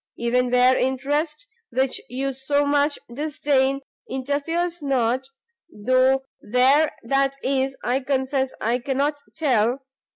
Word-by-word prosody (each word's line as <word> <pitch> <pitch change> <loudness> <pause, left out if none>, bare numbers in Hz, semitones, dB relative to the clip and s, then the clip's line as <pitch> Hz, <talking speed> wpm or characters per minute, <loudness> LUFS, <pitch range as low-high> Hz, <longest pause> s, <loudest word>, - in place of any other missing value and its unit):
even 245 +1 +1
where 250 +1 +5
interest, 290 +5 -1 0.2
which 260 +2 0
you 270 +2 -2
so 285 +2 0
much 285 +1 +2 0.2
disdain, 275 -1 0 0.3
interferes 310 +6 -2
not, 260 -2 0 0.4
though 255 +4 +2 0.2
where 265 +7 +3
that 275 +3 +1
is 270 0 0
I 250 +2 +1
confess 265 0 -1
I 235 +3 0
cannot 280 +3 -1 0.2
tell! 260 -4 +1
270 Hz, 110 wpm, -23 LUFS, 255-285 Hz, 0.4 s, where